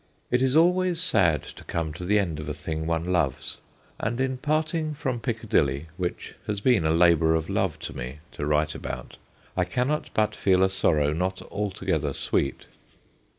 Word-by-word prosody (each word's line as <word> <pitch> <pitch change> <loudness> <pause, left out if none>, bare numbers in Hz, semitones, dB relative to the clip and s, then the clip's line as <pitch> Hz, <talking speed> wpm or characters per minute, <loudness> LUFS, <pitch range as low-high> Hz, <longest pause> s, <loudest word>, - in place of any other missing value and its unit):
It 125 +1 +3
is 130 +1 +2
always 180 +1 +4
sad 90 - +3
to - - -11
come 80 -2 -3
to 90 - -8
the 105 +3 +3
end 85 -7 0
of 75 0 -5
a 75 - -3
thing 80 +1 -4
one 80 0 0
loves, 85 -7 -1 0.4
and 115 +3 -2
in 130 -1 0
parting 155 +1 0
from 130 -5 -2
Piccadilly, 85 - 0
which 90 -1 -4
has 105 -1 -1
been 110 -6 +3
a - - +3
labour 80 -1 +4
of 80 0 -2
love - - 0
to - - -5
me 65 +3 -6
to 75 - -4
write 75 0 +2
about, - - -6 0.4
I - - +2
cannot 135 +5 -1
but 110 0 +2
feel 95 -1 +3
a 95 - +4
sorrow 75 -6 +2
not 90 +3 -2
alto 100 -1 -3
gether - - 0
sweet. 70 - -1
95 Hz, 185 wpm, -26 LUFS, 80-125 Hz, 0.4 s, always